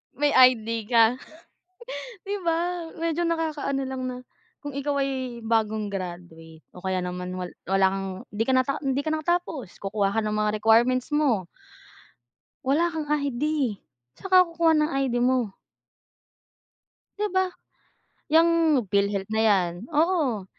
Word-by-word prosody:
My 290 +1 +2
ID 230 -4 +4
ka? 235 0 +4 1.1
Di 405 +1 -2
ba 340 0 -1
medyo 330 +1 -1
nakakaano 310 -4 -1
lang 260 0 -5
na, 250 - -4 0.5
kung 290 -2 -6
ikaw 280 +1 -2
ay 260 -3 -4
bagong 220 -1 +1
graduate 175 -4 -8
o 180 - -12
kaya 190 -1 -1
naman 180 0 -5
wal 180 -1 -5 0.2
wala 195 0 +4
kang 195 0 -3 0.3
di 215 +2 0
ka 265 - +2
nata 255 +3 +1
hindi 275 0 0
ka 310 - 0
nakatapos, 315 - -2
kukuha 200 0 -1
ka 225 - +2
ng 210 - -1
mga 210 0 0
requirements 240 +5 +3
mo 255 - +1 1.2
wala 315 +6 +2
kang 320 -2 -4
ID. 285 -4 0 0.4
Saan 385 - -8
ka 370 - +9
kukuha 335 -1 +3
ng 305 0 +2 0.2
ID 245 -2 -2
mo? 250 -5 +1 1.6
Di 420 - 0
ba? 375 -1 +2 0.8
Yang 325 +2 +5 0.4
PhilHealth 200 0 0
na 220 - +1
yan, 185 -4 +2 0.2
oo. 300 - +1
255 Hz, 140 wpm, -25 LUFS, 210-305 Hz, 1.6 s, ka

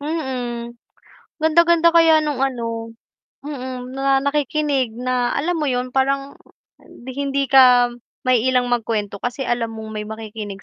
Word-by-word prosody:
Mm, 255 -6 -4 0.7
ganda 320 +2 +4
ganda 340 0 +4
kaya 325 -1 +6
no'ng, 300 -4 -2
ano 230 -3 -3 0.5
mm, 255 -3 -6
na 270 0 +1
nakikinig 285 -3 0
na, 250 0 -1
alam 335 +4 -1
mo 300 - -1
'yon, 250 -1 -1
parang 275 +1 -1 0.5
di 250 +2 -11
hindi 275 -1 -1
ka 250 -2 +6 0.3
maiilang 250 0 +2
magkuwento 220 -4 -1
kasi 245 +5 -4
alam 240 -3 -2
mong 220 0 -8
may 210 -1 -5
makikinig 215 -2 -7
255 Hz, 135 wpm, -20 LUFS, 235-280 Hz, 0.7 s, kaya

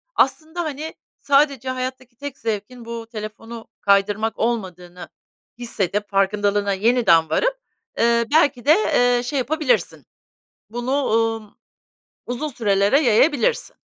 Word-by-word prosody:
aslında, 320 +2 0
hani, 310 0 -5 0.3
sadece 275 -2 +2
hayattaki 255 -1 -5
tek 280 +1 -7
zevkin 225 +2 -5
bu 230 -1 -7
telefonu 225 +1 -8
kaydırmak 205 +2 +1
olmadığını 180 -6 -4 0.5
hissedip 205 -4 -2
farkındalığına 200 0 +1
yeniden 195 -7 +3
varıp, - - +1 0.4
ııı, 235 0 +3
belki 285 -6 +3
de, 300 - +7 0.4
ııı, 245 - 0
şey 275 +3 -2
yapabilirsin 300 +1 -1 0.6
bunu, 240 +3 -4
umm, 225 -1 -1 0.7
uzun 245 +5 -3
sürelere 205 0 +2
yayabilirsin. 250 +1 +2
235 Hz, 110 wpm, -21 LUFS, 205-265 Hz, 0.7 s, de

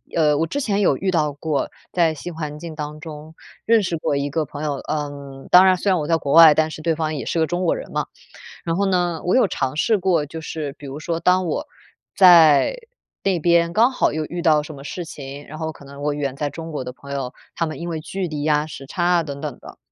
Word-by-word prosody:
呃， 150 -3 +3
我 165 - 0
之 285 - -3
前 205 -5 0
有 160 - +3
遇 190 -1 -1
到 150 -4 +1
过， 145 -1 -2 0.2
在 170 -3 +3
新 165 +3 -7
环 150 -2 -5
境 165 -1 -8
当 150 0 -6
中 155 0 -10 0.3
认 230 -1 +4
识 175 -2 -2
过 145 - -1
一 140 +1 -1
个 155 +2 -1
朋 145 +2 -8
友， 150 -2 -1
呃， 140 -2 -6
当 180 +1 +8
然 185 - +5
虽 200 - -1
然 185 -3 +3
我 150 - -3
在 165 - +3
国 140 -3 -4
外， 165 -2 +9
但 155 +1 +1
是 155 - -8
对 165 0 0
方 155 -1 -2
也 140 - -5
是 170 - -1
个 160 - +2
中 175 +2 -2
国 - - +2
人 - - -8
嘛。 - - -2 0.6
然 165 -1 -1
后 200 +3 +1
呢， 175 -3 0
我 180 - +2
有 255 -5 +4
尝 130 -6 -2
试 215 +8 +2
过， 175 -5 +1
就 160 +2 -7
是 150 -2 -5
比 145 - -11
如 140 +3 -7
说 165 +1 -3
当 180 +2 +3
我 295 - -3 0.5
在 170 - +7 0.5
那 190 -3 +1
边 170 0 +3
刚 230 +7 +4
好 255 - +1
又 155 +1 -2
遇 175 +3 -5
到 155 -3 +3
什 155 - -9
么 140 -1 -11
事 175 - -5
情， 140 -3 -9
然 155 - -9
后 160 0 -4
可 140 - -15
能 140 +1 -11
我 145 0 0
远 140 -2 -3
在 145 0 -1
中 165 +3 -8
国 145 -4 -4
的 125 - -6
朋 140 +1 -12
友， 135 -2 -3 0.2
他 165 - 0
们 155 - -6
因 175 - -4
为 160 -2 -3
距 185 +4 -4
离 150 -2 -4
呀， 150 -1 +2
时 140 -3 -9
差 175 +3 -3
啊 175 -1 +3
等 140 -2 -7
等 150 -5 -5
的， - - -13
155 Hz, 280 characters per minute, -21 LUFS, 145-175 Hz, 0.6 s, 外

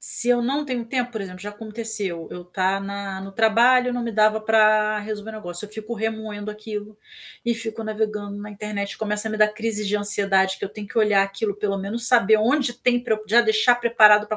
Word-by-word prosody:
Se 240 - -2
eu 240 -1 +4
não 280 +5 0
tenho 250 -4 -3
tempo, 245 0 -2
por 220 -3 -5
exemplo, 185 -1 -8
já 205 - -6
aconteceu, 210 -5 -5
eu 180 - -7
estar 190 +2 -1
na 195 -1 -5
no 195 0 -8
trabalho, 240 +4 +4
não 245 0 -2
me 230 - -3
dava 215 0 +3
para 215 -1 +3
resolver 210 +1 -6
o - - -10
negócio, 175 -2 -4
eu - - -9
fico 220 +2 -6
remoendo 220 -1 -4
aquilo 210 0 -7 0.5
e 235 0 +1
fico 225 -1 -5
navegando 210 -2 -3
na 205 0 -8
internet, 205 -1 -5
começa 210 0 -2
a - - -4
me 215 - -4
dar 215 0 +5
crises 210 -1 -3
de 210 - +1
ansiedade 195 -2 +1
que - - -4
eu - - -4
tenho 205 0 -9
que 225 - -3
olhar 210 -2 +4
aquilo, 195 +1 -2
pelo 200 -1 -1
menos 215 +5 -3
saber 230 -4 +5
onde 245 +3 +1
tem 245 0 +1
para 220 - +1
eu 215 - -8
já 225 +3 +5
deixar 220 +1 +4
preparado 215 -3 +6
para 215 0 -3
215 Hz, 225 wpm, -23 LUFS, 205-225 Hz, 0.5 s, preparado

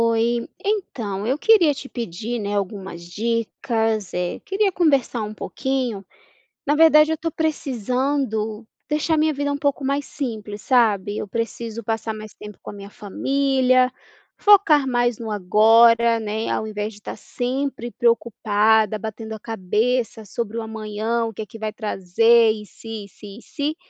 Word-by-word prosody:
Oi, 230 +1 +1 0.2
então 230 - -2
eu 265 +3 +1
queria 345 -6 +4
te 270 - -8
pedir, 230 0 -4
né, 205 -1 -3
algumas 195 -3 -4
dicas, 225 0 -1
eh, 180 0 -2
queria 400 0 +1
conversar 280 -9 +1
um 210 0 -4
pouquinho. 250 -2 -3 0.6
Na 290 - +3
verdade 305 0 +6
eu - - +2
estou 330 +1 -3
precisando 255 -6 -2 0.2
deixar 305 +1 +1
minha 310 0 +2
vida 285 +1 -1
um 285 - -3
pouco 285 -1 -1
mais 280 +1 -1
simples, 215 -6 -5
sabe? 210 -5 +2
Eu 210 - -5
preciso 230 +1 -4
passar 225 0 -2
mais 215 -1 -9
tempo 210 -1 -11
com - - -7
a - - -9
minha 200 -1 -10
família, 255 +4 +1 0.5
focar 375 -9 +5
mais 240 -2 +1
no 225 -2 -5
agora, 225 +4 +5
né, 220 0 -3
ao 220 - -1
invés 210 0 -4
de 205 - -16
estar - - -7
sempre 255 -1 -3
preocupada, 220 -2 +2
batendo 220 +1 -6
a - - -7
cabeça 225 +3 -1
sobre 225 +2 -4
o 230 - -2
amanhã, 220 +1 -2
o 225 - -6
que 220 - -5
é - - -7
que 225 - -12
vai 215 0 -3
trazer, 225 +3 +3
e 215 -1 -3
se, 220 0 -9
e - - -13
se, 210 - -14
e - - -21
se. 295 +2 -3
230 Hz, 165 wpm, -22 LUFS, 215-270 Hz, 0.6 s, verdade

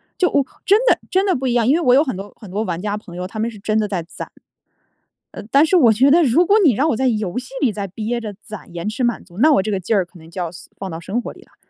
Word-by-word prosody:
就 365 -3 +2
我 280 -2 +2 0.2
真 410 +2 +4
的 - - +4
真 380 +2 +2
的 380 - +2
不 265 0 -2
一 245 - +1
样， 235 -2 +2
因 265 - +5
为 340 - 0
我 250 -6 +4
有 280 - +5
很 260 -9 -3
多 195 +2 -8
很 210 -5 -11
多 205 +3 -1
玩 175 -5 -3
家 205 +2 -2
朋 185 -5 -12
友， 180 +1 -4
他 205 +4 -7
们 225 +2 0
是 225 - -11
真 215 +2 0
的 215 - 0
在 190 -4 -3
攒。 170 - -9 1.0
呃， - - -7
但 280 +3 +5
是 335 - +1
我 255 -10 +6
觉 250 +6 +4
得 335 +4 +5
如 300 +6 +3
果 405 +4 +4
你 290 -8 +5
让 275 +9 +1
我 - - +1
在 265 +4 +1
游 210 -5 -1
戏 250 0 -5
里 265 -6 +3
再 200 -1 -4
憋 220 +5 -3
着 215 -2 -6
攒 215 -5 -10
延 170 +2 -5
迟 225 +5 -2
满 240 -1 0
足， 175 -1 -17
那 310 +6 +5
我 195 - +4
这 215 +3 -3
个 195 - -1
劲 190 +5 -1
儿 190 -3 +2
可 175 +1 -18
能 160 0 -15
就 180 - -5
要 170 - -2 0.3
放 195 - -6
到 165 -2 -6
生 195 +8 -3
活 - - -7
里 - - -17
啦。 - - -23
220 Hz, 345 characters per minute, -19 LUFS, 195-265 Hz, 1.0 s, 我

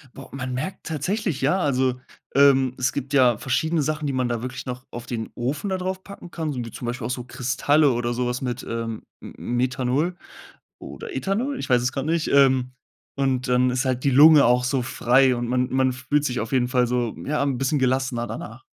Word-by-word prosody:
Boah. 135 - -11
Man 130 -1 -5
merkt 155 +9 -5
tatsächlich, 170 +1 -2
ja, 150 +8 +2
also, 130 -5 +1 0.4
ähm, 135 -2 +5
es 125 0 0
gibt 140 0 -5
ja 125 -5 +4
verschiedene 160 +6 0
Sachen, 155 +1 -2
die 140 - -1
man 130 -1 0
da 120 -1 -2
wirklich 125 +1 -6
noch 125 +1 -6
auf 120 0 -8
den 115 -2 -4
Ofen 140 +11 -2
da 190 - 0
draufpacken 185 0 -6
kann, 160 -3 -3
so 125 - -4
wie 115 - -8
zum 120 - -8
Beispiel 120 -1 -4
auch - - -6
so 125 0 -4
Kristalle 130 +4 +2
oder 120 0 -1
so 125 +1 -1
was 125 0 -3
mit, 125 -1 -3
ähm, 115 -1 -4 0.2
M - - -10
Methanol 130 +7 -1 0.6
oder 460 -4 -9
Ethanol? 245 +8 -1
Ich - - -5
weiß 125 -1 +4
es 125 +1 0
grad 135 0 -3
nicht. 165 0 0
Ähm, 130 -2 +4 0.4
und 135 -2 0
dann 125 0 +3
ist 125 +2 -1
halt 130 -1 -1
die 140 - +3
Lunge 145 +1 +7
auch 125 +1 +3
so 125 0 0
frei, 130 +1 +3
und 120 0 -3
man 125 +1 0
man 130 0 +1
fühlt 140 +3 -1
sich 125 -3 -1
auf 110 +2 -4
jeden 125 -2 +2
Fall 125 -1 +2
so 120 -2 -1
ja, 150 0 0
'n 135 -3 -1
bisschen 135 +2 +1
gelassener 130 -2 0
danach. 115 +2 -8
130 Hz, 215 wpm, -23 LUFS, 125-145 Hz, 0.6 s, Lunge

